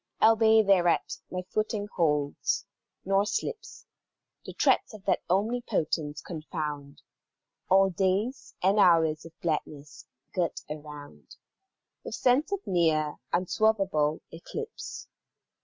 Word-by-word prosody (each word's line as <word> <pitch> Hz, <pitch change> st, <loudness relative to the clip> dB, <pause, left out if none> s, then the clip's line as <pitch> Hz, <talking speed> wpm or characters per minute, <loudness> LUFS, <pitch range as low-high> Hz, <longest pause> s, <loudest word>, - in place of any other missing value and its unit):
Albeit 220 Hz, -1 st, +5 dB
thereat 180 Hz, -3 st, +2 dB
my 185 Hz, 0 st, -4 dB
footing 215 Hz, +1 st, -2 dB
holds, 150 Hz, -4 st, 0 dB, 0.4 s
nor 195 Hz, +1 st, +3 dB
slips, 445 Hz, -, -4 dB, 0.6 s
The -, -, -8 dB
threats -, -, +2 dB
of 200 Hz, -2 st, -14 dB
that -, -, +1 dB
Omnipotence 180 Hz, -8 st, -1 dB
confound 150 Hz, -4 st, -6 dB, 0.7 s
All 195 Hz, 0 st, +5 dB
days 195 Hz, +8 st, -1 dB
and 195 Hz, +3 st, +3 dB
hours 160 Hz, -5 st, +4 dB
of 165 Hz, -, -14 dB
gladness, 150 Hz, -3 st, -4 dB, 0.3 s
girt 175 Hz, -3 st, -1 dB
around 150 Hz, -1 st, -10 dB, 0.7 s
With -, -, -5 dB
sense 260 Hz, +8 st, +2 dB
of 400 Hz, 0 st, -3 dB
near, 160 Hz, -4 st, +1 dB
unswervable 185 Hz, -5 st, +1 dB
eclipse. 440 Hz, -, -7 dB
180 Hz, 105 wpm, -28 LUFS, 155-215 Hz, 0.7 s, Albeit